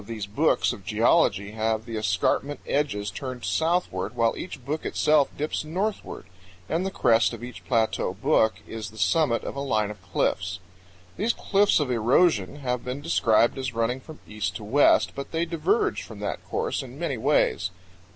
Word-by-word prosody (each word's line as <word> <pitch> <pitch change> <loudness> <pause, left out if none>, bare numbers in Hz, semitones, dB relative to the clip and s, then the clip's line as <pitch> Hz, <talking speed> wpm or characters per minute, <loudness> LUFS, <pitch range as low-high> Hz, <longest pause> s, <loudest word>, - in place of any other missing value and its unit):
93 115 +3 -7
these 105 -3 -4
books 100 +2 +1
of - - -10
geology 100 +2 +2
have 110 0 -1
the 115 -1 -6
escarpment 110 +8 0
edges 105 -9 -1
turned 130 -3 -6
southward, 160 - 0
while 115 -1 +2
each 135 -8 -8
book 155 +3 -3
itself 150 -2 +3
dips 150 +1 -2
northward, 190 +7 -3 0.4
and 165 +7 0
the 190 - -1
crest 115 - +3
of - - -8
each 125 0 -9
plateau 115 -6 +1
book 110 -1 +2
is 110 -2 -6
the 110 - -15
summit 115 - +2
of - - -5
a - - -4
line 110 -7 0
of 105 -3 -11
cliffs. - - -1 0.6
These 230 +3 +1
cliffs 200 -2 +2
of 145 -4 -1
erosion 120 - +3
have 125 -2 -2
been 125 +3 -4
described 120 -5 +2
as 130 -2 -4
running 115 +3 0
from 155 +3 -12
east 105 -1 -3
to 110 - -6
west, 135 +8 +4
but 140 - -7
they 165 +1 0
diverge 410 - 0
from - - -10
that - - -3
course - - -1
in - - -10
many - - -2
ways. - - +2
125 Hz, 180 wpm, -26 LUFS, 110-155 Hz, 0.6 s, west